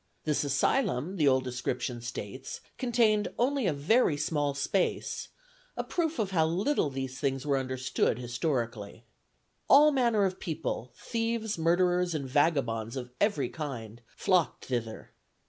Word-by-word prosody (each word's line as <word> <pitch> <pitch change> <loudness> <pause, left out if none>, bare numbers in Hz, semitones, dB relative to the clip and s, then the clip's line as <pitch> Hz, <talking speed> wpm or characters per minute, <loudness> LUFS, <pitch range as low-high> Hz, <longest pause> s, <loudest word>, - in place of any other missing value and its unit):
This 150 -2 +1
asylum, 145 - +1
the 150 -4 +3
old 130 -1 +4
description 125 -1 -3
states, 120 +2 -6 0.2
contained 230 -4 +2
only 260 -2 +1
a - - +3
very 150 - +2
small 145 -1 0
space, 175 +7 -1 0.5
a - - -1
proof 330 -3 -1
how 160 -4 +3
little 185 - +1
these 130 -1 -5
things 135 -2 -1
were 140 -2 +2
understood 130 -3 0
historically. 120 -4 -3 0.7
All 300 +2 +8
manner 235 -7 +3
of 185 -1 -2
people, 140 -6 -4
thieves, 230 -2 -2
murderers, 175 +1 +2
and 140 -3 -3
vagabonds 125 -6 +1
of 125 -2 -5
every 150 - +2
kind, 120 -7 -6 0.2
flocked 180 -4 +1
thither. 115 -3 -4
145 Hz, 130 wpm, -29 LUFS, 125-195 Hz, 0.7 s, All